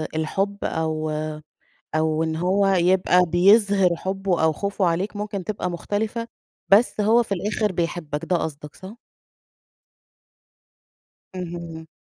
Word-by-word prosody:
الحب 195 +6 -1
أو 155 -1 -2 0.9
أو 155 0 +1
إن 160 0 -2
هو 190 +4 +1
يبقى 180 -1 +3
بيظهِر 195 +2 +4
حُبُّه 190 -2 -2
أو 160 - +3
خوفه 200 +2 -1
عليك، 180 +5 -1
ممكن 205 -2 -4
تبقى 205 -3 -3
مختلفة، 215 +6 -3 0.4
بس 210 +2 +4
هو 230 +3 +4
في 210 - -17
الآخر 210 +2 -1
بيحبَّك، 165 -3 -3
ده 180 0 +1
قصدك 150 -2 -6
صح؟ 195 +4 -10 2.4
اهم. 170 -2 -7
180 Hz, 115 wpm, -23 LUFS, 160-200 Hz, 2.4 s, بيظهِر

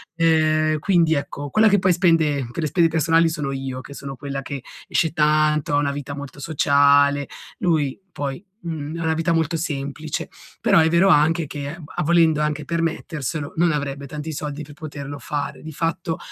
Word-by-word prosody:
Ehm, 155 -1 +2
quindi 170 -2 +3
ecco, 145 -1 -3
quella 220 +7 +4
che 205 0 +4
poi 185 0 +3
spende 160 -7 +2
per 165 - -4
le - - +1
spese 170 +3 +3
personali 165 +1 +3
sono 150 -4 -3
io, 135 -1 -4
che 140 - -11
sono 140 -1 -7
quella 140 +1 -5
che 140 0 -6 0.3
esce 160 - +1
tanto, 150 -1 +2
ha - - +4
una 145 -1 +1
vita 145 0 -5
molto 145 0 -8
sociale; 145 -1 +3 0.3
lui 155 -7 +1
poi, 140 +4 -4 0.2
mhmm, 160 -2 -5
ha - - -3
una 160 0 +1
vita 165 +1 0
molto 165 0 +1
semplice. 150 -1 -4 0.3
Però - - +5
è 160 0 +4
vero 170 +4 +4
anche 160 0 +4
che, 145 +1 -5
b - - -11
a - - 0
volendo 165 -1 +4
anche 150 0 -1
permetterselo, 160 -3 -3
non 170 +1 +3
avrebbe 140 -2 -3
tanti 150 +3 -6
soldi 150 0 -5
per 145 0 -12
poterlo 145 -2 -7
fare. 145 -3 -4
Di 160 - -8
fatto 165 +1 -2
150 Hz, 190 wpm, -22 LUFS, 140-165 Hz, 0.3 s, Però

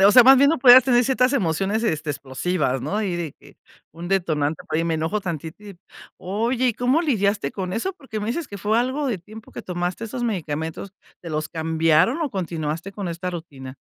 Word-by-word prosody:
m 195 - +6
o 205 - +6
sea, 250 - +9
más 265 +2 +8
bien 280 +1 +6
no 325 - +1
podías 250 0 +8
tener 245 -2 +4
ciertas 260 +1 +2
emociones, 195 - 0
este, 155 -8 -1
explosivas, 135 0 -2
¿no?, 200 - -2
y 180 -4 -2
de 165 -5 -4
que - - -20 0.4
un 170 +2 -8
detonante, 160 -5 0
por - - -3
ahí 165 - 0
me 165 -1 0
enojo 160 +7 -1
tantito 170 +2 -6
y 200 -3 -10 0.4
oye, 230 +7 -1
¿y - - +1
cómo 255 +8 +1
lidiaste 205 - 0
con 185 +1 -5
eso?, 375 - -2
porque 265 - -7
me 210 - -4
dices 285 +6 -2
que 200 - -8
fue 210 +4 +1
algo 265 +3 -1
de 210 -7 -2
tiempo 215 +5 -13
que - - -8
tomaste 180 +4 -3
esos 240 +2 -5
medicamentos, 160 -3 -3 0.3
¿te 170 - -8
los 155 0 -3
cambiaron 160 - +2
o 290 - -2
continuaste 170 -1 -4
con 195 -3 -5
esta 175 +2 -4
rutina? 140 -6 -9
190 Hz, 215 wpm, -23 LUFS, 160-235 Hz, 0.4 s, sea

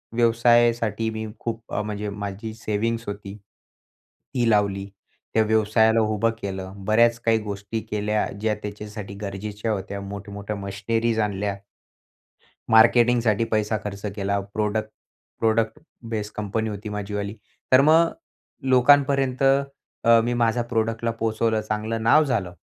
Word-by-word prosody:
व्यवसायासाठी 115 -2 +3
मी 110 0 -4
खूप, 115 -1 -4
अ, - - 0
म्हणजे 105 0 -4
माझी 100 +2 -5
सेविंग्स 115 +1 -2
होती, 100 -1 -6
ती 115 +4 -7
लावली. 100 -2 +2 0.5
त्या 110 - +4
व्यवसायाला 110 +1 +3
उभं 110 +1 +1
केलं. 95 -1 -5
बऱ्याच 115 +2 +4
काही 115 -1 +4
गोष्टी 100 +2 -4
केल्या, 105 0 0 0.2
ज्या 110 -1 +1
त्याच्यासाठी 105 0 -7
गरजेच्या 105 +2 -4
होत्या. 100 -1 -4
मोठ्या-मोठ्या 100 +1 -6
मशिनरीज 110 +3 -1
आणल्या. 100 -1 -1 1.2
मार्केटिंगसाठी 115 -1 +5
पैसा 110 0 +1
खर्च 100 -1 -6
केला. 100 0 0
प्रोडक्ट 110 0 -1 0.5
प्रोडक्ट 110 0 +1 0.3
बेस 105 -2 -3
कंपनी 105 +1 -2
होती 105 +1 -6
माझी 105 0 -5
वाली. 100 0 -3 0.4
तर 130 - +8
मग 160 +3 +5 0.6
लोकांपर्यंत, 135 0 +4 0.6
अ, 115 0 +6
मी 120 +1 0
माझा 120 0 +1
प्रॉडक्टला 115 0 0
पोहोचवलं, 115 0 0
चांगलं 110 +1 -3
नाव 150 +7 +5
झालं. 100 -11 -2
110 Hz, 125 wpm, -24 LUFS, 105-115 Hz, 1.2 s, तर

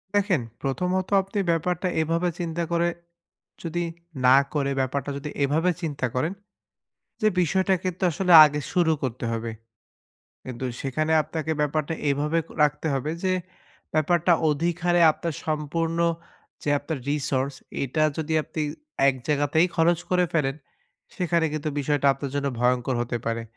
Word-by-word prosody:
দেখেন, 195 - +2 0.2
প্রথমত 180 +7 -1
আপনি 195 +2 -4
ব্যাপারটা 175 +2 0
এভাবে 165 +3 0
চিন্তা 170 -1 -2
করে, 170 0 +2 0.8
যদি 175 +1 -2 0.4
না 130 +1 +8 0.2
করে 140 -2 0
ব্যাপারটা 135 +1 -2
যদি 140 +2 -6
এভাবে 160 +6 +2
চিন্তা 145 -6 -2
করেন, 155 +8 0 0.9
যে 215 - +4
বিষয়টাকে 190 +1 +1
কিন্তু 185 +1 -3
আসলে 180 +2 +2
আগে 150 0 -1
শুরু 175 -3 +3
করতে 125 -2 -3
হবে। 115 0 -3 0.9
কিন্তু 130 0 -5 0.2
সেখানে 155 +4 -1
আপনাকে 160 +1 -4
ব্যাপারটা 150 +1 0 0.2
এভাবে 150 +3 0 0.3
রাখতে 150 +2 +1
হবে 135 +3 -1
যে, 185 -1 +2 0.6
ব্যাপারটা 170 +3 +3 0.2
অধিকারে 175 +3 +1
আপনার 165 0 -5
সম্পূর্ণ 160 +2 -1 0.6
যে - - -1
আপনার 150 +2 -4
resource 140 -2 -1 0.3
এটা 145 +4 0
যদি 160 0 -2
আপনি 155 - -5 0.5
এক 135 - -2
জায়গাতেই 150 +3 +2
খরচ 165 +1 +3
করে 180 -1 +3
ফেলেন, 135 -4 +1 0.6
সেখানে 170 -2 +1
কিন্তু 155 0 -2
বিষয়টা 145 0 +1
আপনার 135 0 -6
জন্য 140 0 0
ভয়ঙ্কর 125 +1 +1
হতে 120 0 -2
পারে। 115 0 -2
155 Hz, 135 wpm, -25 LUFS, 140-170 Hz, 0.9 s, না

